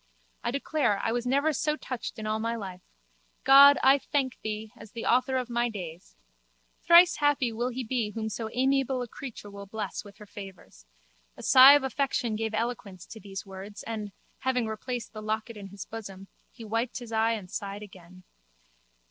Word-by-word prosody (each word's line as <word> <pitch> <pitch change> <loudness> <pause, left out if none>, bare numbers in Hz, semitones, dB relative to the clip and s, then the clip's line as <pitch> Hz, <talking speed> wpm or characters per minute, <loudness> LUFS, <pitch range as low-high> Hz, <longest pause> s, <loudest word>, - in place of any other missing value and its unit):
I - - 0
declare, 275 -4 0
I 225 - +1
was 240 +1 -2
never 285 +4 +2
so 300 +1 0
touched 255 -5 -6
in 220 - -6
all 215 0 -1
my 230 +1 -1
life. 190 -5 -7 0.6
God, 280 +1 +9
I 270 +2 +6
thank 270 -3 -2
thee, 215 0 -5
as 215 0 -14
the 230 - -5
Author 255 +2 +2
of 250 -2 -2
my 240 0 0
days! 175 - -8 0.7
Thrice 340 0 +7
happy 290 -5 +2
will 240 +3 -2
he 255 +1 -4
be 235 -2 -1
whom 220 +1 -4
so 220 +1 -4
amiable 265 0 +1
a - - -7
creature 230 -4 -9
will 200 0 -9
bless 220 +2 -5
with 200 -1 -14
her 210 - -12
favours. 190 - -12 0.5
A - - -10
sigh 265 +2 +9
of 290 -1 +4
affection 265 -4 -1
gave 220 0 -2
eloquence 215 -5 -4
to 220 - -11
these 195 -2 -8
words 195 +2 -9
and, 215 -3 -5 0.3
having 255 -2 0
replaced 220 +1 -5
the 215 - -7
locket 220 +2 -3
in 200 -2 -8
his 195 0 -9
bosom, 195 -3 -9 0.2
he 230 - -11
wiped 230 +3 -2
his 240 -2 -8
eye 225 +1 +2
and 200 -5 -6
sighed 200 0 -5
again. 185 -2 -14
225 Hz, 190 wpm, -28 LUFS, 205-255 Hz, 0.7 s, God